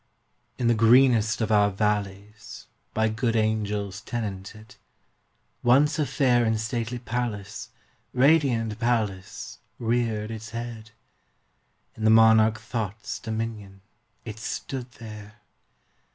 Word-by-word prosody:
In 125 - -2
the 120 - +4
greenest 115 0 +4
of 110 - 0
our 105 -1 +4
valleys 105 +1 -3 0.3
By 110 0 +1
good 115 +1 -1
angels 105 -2 -1
tenanted, 105 -2 -6 0.8
Once 145 +6 +3
a 150 - +1
fair 125 -4 +2
and 110 -1 +1
stately 115 +1 -3
palace 115 -4 -4 0.4
Radiant 125 -6 +2
palace 110 -6 -2 0.2
reared 115 -2 -1
its 110 -1 -7
head. 115 -2 -7 1.1
In 110 - -7
the 110 - +4
monarch 110 0 +5
Thought's 110 -2 -5
dominion 110 -3 -5 0.4
It 110 -1 -7
stood 125 +2 -5
there! 105 -2 -10
110 Hz, 110 wpm, -25 LUFS, 105-120 Hz, 1.1 s, monarch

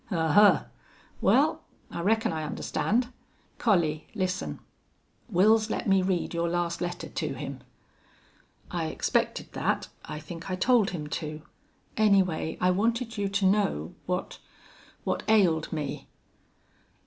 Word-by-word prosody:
"Ahuh! 180 +1 +5 0.6
Well, - - +3 0.3
I 170 - -4
reckon 220 0 +2
I 160 - -2
understand. 200 +9 -1 0.5
Collie, 170 -8 +1
listen. 185 -2 -2 0.7
Wils 215 +4 +4
let - - -2
me 195 -1 +4
read 185 -2 -1
your 170 0 0
last 170 0 -1
letter 175 0 -3
to - - -3
him." 140 -2 -6 1.1
"I - - -1
expected - - -1
that. - - -1
I 150 0 -6
think 165 +4 -8
I 185 - -1
told 225 +2 +3
him 155 -5 -5 0.2
to. 155 0 -6 0.5
Anyway, 190 -7 +2
I 180 - +3
wanted 230 +3 0
you 200 -1 0
to 200 0 0
know 190 - +1
what 180 0 -3 0.6
what - - -1
ailed 180 -8 +3
me." 150 -4 -4
180 Hz, 125 wpm, -28 LUFS, 160-205 Hz, 1.1 s, Ahuh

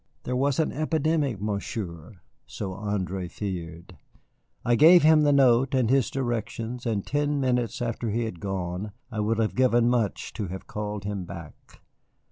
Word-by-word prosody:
There 125 - -2
was 135 +1 +1
an 160 - +1
epidemic, 155 - 0
Monsieur, 100 -3 -5 0.3
so 95 -2 -5
André 95 -2 -3
feared. 85 -5 -6 0.7
I 120 - +3
gave 165 +7 +7
him 155 0 +6
the 145 -1 +4
note 135 -1 +4
and 125 -3 +2
his 135 -3 +3
directions, 120 -1 -3
and 105 -4 -1
ten 145 0 0
minutes 125 -2 0
after 115 -1 -2
he 115 +3 0
had 90 -7 -6
gone 95 +2 -4 0.2
I 110 - -4
would 105 +1 +1
have 110 -1 0
given 120 -2 +3
much 115 -5 -1
to 105 - -4
have 95 +2 -7
called 105 -1 -5
him 100 -2 -4
back. 85 -3 -11
115 Hz, 160 wpm, -26 LUFS, 100-130 Hz, 0.7 s, gave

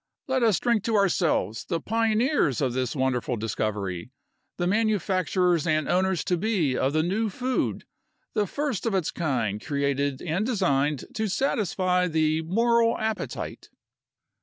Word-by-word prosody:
Let 260 -1 +1
us 220 -5 +3
drink 235 -4 +1
to 230 - +1
ourselves, 170 - +1
the 165 - -1
pioneers 225 - +1
of 130 -4 0
this 130 0 -2
wonderful 130 -2 0
discovery, 105 -3 -3 0.5
the 175 - -1
manufacturers 185 -4 +1
and 155 -1 +1
owners 185 -1 +1
to 180 - 0
be 175 - +1
of 135 +2 0
the 155 0 +2
new 210 +6 0
food, 255 +6 -2 0.5
the 205 -1 +1
first 280 - -2
of 215 - 0
its 185 -5 0
kind 115 - -1
created 140 -2 -1
and 180 +4 -1
designed 150 - +1
to 220 0 -1
satisfy 185 -5 +1
the 155 -1 +1
moral 230 +6 +2
appetite." 220 0 -4
180 Hz, 140 wpm, -26 LUFS, 140-215 Hz, 0.5 s, us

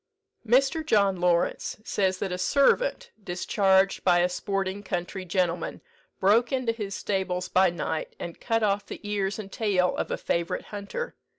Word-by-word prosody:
Mr. 270 +7 +3
John 200 -10 +3
Lawrence, 175 -1 +1
says 190 -3 0
that 190 0 -3
a 180 - -2
servant, 480 - +2
discharged 190 +1 +2
by 180 -2 +4
a 175 +1 +3
sporting 195 +1 -2
country 185 0 -4
gentleman, 175 -1 -1 0.4
broke 220 +5 +4
into 255 -3 +1
his 205 -4 -5
stables 185 -2 -2
by 185 0 +4
night, 170 -2 -4
and 170 - -7
cut 225 -1 0
off 205 -1 +1
the - - -7
ears 200 -1 -1
and 200 -3 -8
tail 190 -5 +1
of - - -2
a - - -1
favourite 170 0 -2
hunter. 205 - -5
195 Hz, 160 wpm, -27 LUFS, 180-215 Hz, 0.4 s, by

